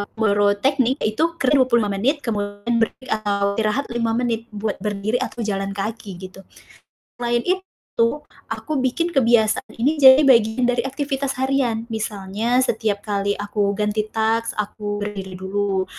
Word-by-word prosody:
boro 205 Hz, -2 st, +2 dB
teknik 265 Hz, +1 st, +2 dB
ya -, -, +3 dB
itu 330 Hz, +6 st, 0 dB
kerja 270 Hz, +2 st, +2 dB
25 235 Hz, -5 st, +2 dB
menit 275 Hz, +7 st, +2 dB
kemudian 205 Hz, +1 st, -2 dB
berhenti 255 Hz, +3 st, -2 dB
atau 200 Hz, -2 st, 0 dB
istirahat 220 Hz, +6 st, 0 dB
5 230 Hz, -1 st, 0 dB
menit 230 Hz, -2 st, -1 dB
buat 210 Hz, -1 st, -4 dB
berdiri 210 Hz, +3 st, -1 dB
atau 240 Hz, -2 st, -3 dB
jalan 195 Hz, -1 st, -2 dB
kaki, 205 Hz, -1 st, -5 dB
gitu. 185 Hz, +1 st, -10 dB, 0.8 s
Selain 240 Hz, 0 st, 0 dB
itu, 375 Hz, +1 st, +1 dB, 0.9 s
aku 310 Hz, -2 st, -3 dB
bikin 335 Hz, +7 st, 0 dB
kebiasaan 230 Hz, -5 st, +2 dB
ini 300 Hz, +5 st, +2 dB
jadi 265 Hz, +2 st, +9 dB
bagian 235 Hz, -1 st, +4 dB
dari 245 Hz, -, +1 dB
aktivitas 270 Hz, -1 st, -2 dB
harian, 255 Hz, -4 st, 0 dB
misalnya 215 Hz, +2 st, -1 dB
setiap 210 Hz, -2 st, -1 dB
kali 200 Hz, -1 st, 0 dB
aku 205 Hz, 0 st, -1 dB
ganti 210 Hz, 0 st, 0 dB
task, 225 Hz, +1 st, 0 dB
aku 205 Hz, 0 st, -5 dB
berdiri 195 Hz, -2 st, -5 dB
dulu, 190 Hz, 0 st, -1 dB
220 Hz, 145 wpm, -21 LUFS, 205-250 Hz, 0.9 s, jadi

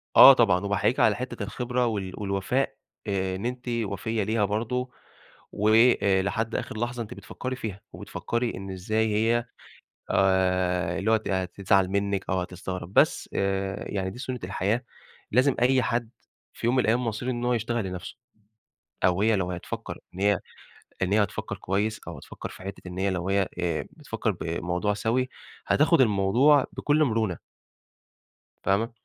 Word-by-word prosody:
آه 135 Hz, -, +12 dB
طبعًا 110 Hz, -8 st, +4 dB
وباحييكِ 100 Hz, -1 st, +1 dB
على -, -, +5 dB
حتّة -, -, -5 dB
الخبرة 125 Hz, 0 st, -1 dB
وال 100 Hz, -5 st, -2 dB
والوفاء 100 Hz, +6 st, -1 dB, 0.3 s
آآ 95 Hz, -2 st, -1 dB
إن 95 Hz, +5 st, -5 dB
أنتِ 125 Hz, +1 st, -4 dB
وفيّة 110 Hz, -1 st, -1 dB
ليها 110 Hz, +1 st, +1 dB
برضه، 120 Hz, +5 st, -2 dB, 0.6 s
وآآ 105 Hz, -2 st, +4 dB
لحد 110 Hz, +3 st, -2 dB
آخِر -, -, -4 dB
لحظة 120 Hz, 0 st, -2 dB
أنتِ 115 Hz, +2 st, -9 dB
بتفكّري 130 Hz, +1 st, -6 dB
فيها 100 Hz, -5 st, -6 dB
وبتفكّري 120 Hz, 0 st, -3 dB
إن 95 Hz, 0 st, -6 dB
إزاي 110 Hz, +4 st, 0 dB
هي 115 Hz, +2 st, +2 dB, 0.7 s
آآ 90 Hz, -2 st, +2 dB
اللي 100 Hz, +3 st, 0 dB
هو 115 Hz, -, +6 dB
ت 110 Hz, -, -5 dB
هتزعل 95 Hz, +1 st, +1 dB
منِّك 100 Hz, 0 st, -1 dB
أو 95 Hz, 0 st, +1 dB
هتستغرب، 90 Hz, 0 st, -6 dB
بس -, -, +3 dB
آآ 95 Hz, 0 st, -1 dB
يعني 95 Hz, -2 st, -2 dB
دي 100 Hz, -, -10 dB
سُنة 125 Hz, -1 st, -4 dB
الحياة، 100 Hz, +5 st, -1 dB, 0.5 s
لازم 130 Hz, +4 st, +4 dB
أي 130 Hz, +1 st, +4 dB
حد 120 Hz, 0 st, -1 dB, 0.4 s
في -, -, -4 dB
يوم 120 Hz, -, +3 dB
من -, -, +5 dB
الأيام 120 Hz, +3 st, +2 dB
مصيره 115 Hz, +3 st, -2 dB
إن 120 Hz, -1 st, -3 dB
هو 125 Hz, -, +2 dB
يشتغل 120 Hz, -1 st, -1 dB
لنفسه، 90 Hz, -1 st, -6 dB, 0.9 s
أو 90 Hz, +2 st, +3 dB
هي 110 Hz, 0 st, +4 dB
لو 95 Hz, -2 st, -1 dB
هتفكّر 90 Hz, -1 st, -6 dB, 0.2 s
إن 95 Hz, -, -7 dB
هي 100 Hz, -1 st, +3 dB, 0.6 s
إن 95 Hz, +1 st, +1 dB
هي 105 Hz, 0 st, +5 dB
هتفكّر 105 Hz, 0 st, -4 dB
كويس، 105 Hz, +4 st, -1 dB
أو -, -, -6 dB
هتفكّر -, -, -8 dB
في -, -, -12 dB
حتّة 95 Hz, 0 st, -7 dB
إن 90 Hz, 0 st, -7 dB
هي 100 Hz, +1 st, +1 dB
لو 90 Hz, 0 st, -2 dB
هي 100 Hz, -1 st, +2 dB
آآ 85 Hz, -3 st, 0 dB
بتفكّر -, -, -3 dB
بموضوع 90 Hz, +4 st, -2 dB
سَوِي، 120 Hz, +5 st, 0 dB, 0.4 s
هتاخُد 160 Hz, +2 st, +4 dB
الموضوع 120 Hz, +6 st, +4 dB
بكل 150 Hz, +1 st, +2 dB
مرونة. 110 Hz, -, 0 dB, 1.3 s
فاهمة؟ 105 Hz, +5 st, +1 dB
105 Hz, 160 wpm, -26 LUFS, 95-120 Hz, 1.3 s, آه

